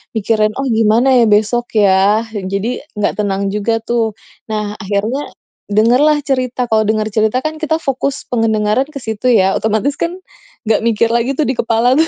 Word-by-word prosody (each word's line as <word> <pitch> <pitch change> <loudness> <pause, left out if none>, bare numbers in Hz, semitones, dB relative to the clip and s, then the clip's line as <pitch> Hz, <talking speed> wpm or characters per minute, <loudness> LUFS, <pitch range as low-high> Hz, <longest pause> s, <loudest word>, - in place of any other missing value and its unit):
mikirin, 215 0 +1
"Oh 270 - -3
gimana 225 +4 +3
ya 230 - +4
besok, 215 +3 +2
ya?" 200 +1 +3
Jadi 200 +4 -3 0.2
gak 210 0 -1
tenang 200 -1 -1
juga, 210 +2 0
tuh. 225 -3 -1 0.3
Nah, 210 -1 -3
akhirnya 215 +7 -2 0.4
dengerlah 245 +9 +3
cerita, 255 -2 -1
kalau 220 -1 +2
denger 215 0 0
cerita 220 +4 +1
kan, 310 0 -4
kita 315 0 0
fokus 275 -2 -2
pendengaran 225 +2 +1
ke 280 -4 -9
situ 220 +3 -3
ya, 195 -6 +4
otomatis 220 +6 -1
kan, 340 +1 -2 0.5
ga 220 -1 +2
mikir 230 0 +1
lagi 235 +3 0
tuh 305 - +1
di 260 - 0
kepala 230 +2 +2
tuh, 320 - +3
225 Hz, 170 wpm, -15 LUFS, 210-255 Hz, 0.5 s, ya